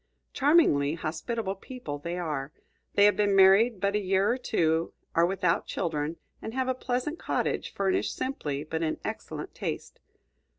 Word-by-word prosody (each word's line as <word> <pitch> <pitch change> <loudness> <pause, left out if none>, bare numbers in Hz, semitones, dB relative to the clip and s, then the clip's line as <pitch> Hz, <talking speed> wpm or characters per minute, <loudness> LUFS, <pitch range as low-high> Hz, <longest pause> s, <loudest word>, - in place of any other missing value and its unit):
Charmingly 265 - +4
hospitable 190 +6 -3
people 195 - -7
they 170 +4 -4
are. 150 -5 -3 0.4
They 200 - +6
have 205 - +5
been 205 -1 +2
married 195 +3 +6
but 200 +1 +1
a - - +3
year 195 +2 +2
or 245 - 0
two, 165 -8 +1 0.2
are 170 +1 +4
without 180 -2 0
children, 160 -2 -2 0.2
and 225 - -6
have 260 -1 0
a 260 - +2
pleasant 255 +5 -2
cottage - - -1
furnished 195 -1 0
simply 150 - -3
but 160 +1 -3
in 160 -1 -1
excellent - - -5
taste. - - -5
190 Hz, 160 wpm, -28 LUFS, 160-230 Hz, 0.4 s, They